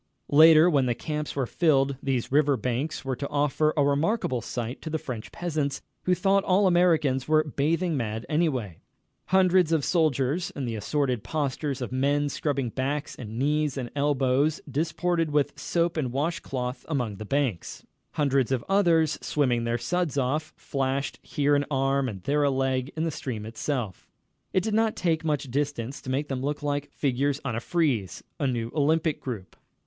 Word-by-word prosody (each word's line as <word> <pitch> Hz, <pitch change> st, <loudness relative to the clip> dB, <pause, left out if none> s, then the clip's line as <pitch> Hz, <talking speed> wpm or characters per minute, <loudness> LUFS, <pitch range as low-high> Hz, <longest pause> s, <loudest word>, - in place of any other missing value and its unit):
Later, 155 Hz, +2 st, +8 dB
when 140 Hz, -7 st, +3 dB
the 120 Hz, -, +1 dB
camps 150 Hz, +3 st, -4 dB
were 135 Hz, -2 st, 0 dB
filled, 140 Hz, -1 st, +2 dB
these 130 Hz, -3 st, -1 dB
river 145 Hz, -1 st, +3 dB
banks 125 Hz, +6 st, -2 dB
were 130 Hz, -1 st, -1 dB
to 140 Hz, +2 st, -5 dB
offer 150 Hz, +1 st, +1 dB
a 145 Hz, -, +4 dB
remarkable 145 Hz, -, +1 dB
sight 120 Hz, +2 st, -5 dB
to 160 Hz, -, -5 dB
the 160 Hz, -, -1 dB
French 120 Hz, -7 st, -7 dB
peasants, 150 Hz, -5 st, -2 dB, 0.2 s
who 180 Hz, -, +3 dB
thought 195 Hz, +2 st, +2 dB
all 195 Hz, +2 st, +3 dB
Americans 165 Hz, -8 st, +3 dB
were 155 Hz, 0 st, +4 dB
bathing 160 Hz, +4 st, 0 dB
mad 115 Hz, -3 st, -3 dB
anyway. 135 Hz, -, -1 dB, 0.5 s
Hundreds 185 Hz, -2 st, +4 dB
of 160 Hz, -4 st, +2 dB
soldiers, 155 Hz, -1 st, +1 dB
in 140 Hz, -, -3 dB
the 115 Hz, -, -3 dB
assorted 125 Hz, +1 st, -1 dB
postures 140 Hz, 0 st, -2 dB
of 125 Hz, -, -5 dB
men 145 Hz, +3 st, +1 dB
scrubbing 140 Hz, -3 st, -1 dB
backs 140 Hz, +5 st, -3 dB
and 110 Hz, -2 st, -7 dB
knees 150 Hz, +1 st, +1 dB
and 125 Hz, -3 st, -4 dB
elbows, 140 Hz, +1 st, +2 dB
disported 165 Hz, +3 st, 0 dB
with 150 Hz, -1 st, +1 dB
soap 170 Hz, 0 st, 0 dB
and 130 Hz, -6 st, -1 dB
wash 150 Hz, +6 st, -1 dB
cloth 125 Hz, -1 st, -4 dB
along 120 Hz, -9 st, -2 dB
the 110 Hz, -, -6 dB
banks. 125 Hz, -5 st, -2 dB, 0.3 s
Hundreds 140 Hz, -4 st, +1 dB
of 130 Hz, -3 st, 0 dB
others, 170 Hz, -6 st, +3 dB
swimming 125 Hz, -5 st, +1 dB
their 115 Hz, 0 st, 0 dB
suds 175 Hz, +2 st, -1 dB
off, 145 Hz, +4 st, 0 dB
flashed 135 Hz, 0 st, -2 dB
here 145 Hz, 0 st, +1 dB
an 145 Hz, -, +2 dB
arm 135 Hz, -1 st, +1 dB
and 95 Hz, -5 st, -8 dB
there 145 Hz, +7 st, +1 dB
a 145 Hz, -, +3 dB
leg 130 Hz, 0 st, 0 dB
in 160 Hz, -, 0 dB
the 165 Hz, -, 0 dB
stream 115 Hz, -7 st, -5 dB
itself. 115 Hz, -, -4 dB, 0.4 s
It 185 Hz, -, +1 dB
did 220 Hz, -, -1 dB
not 220 Hz, 0 st, +2 dB
take 165 Hz, -3 st, 0 dB
much 145 Hz, -4 st, -1 dB
distance 140 Hz, -2 st, -2 dB
to -, -, -8 dB
make 140 Hz, +3 st, -1 dB
them 135 Hz, -2 st, -3 dB
look 145 Hz, +2 st, -3 dB
like 145 Hz, 0 st, -2 dB
figures 140 Hz, +1 st, 0 dB
on 120 Hz, -5 st, -1 dB
a -, -, -1 dB
frieze, 130 Hz, -, -1 dB, 0.2 s
a 140 Hz, -, +1 dB
new 120 Hz, -2 st, -2 dB
Olympic 155 Hz, +1 st, +1 dB
group. 110 Hz, -8 st, -6 dB
140 Hz, 180 wpm, -26 LUFS, 130-155 Hz, 0.5 s, Later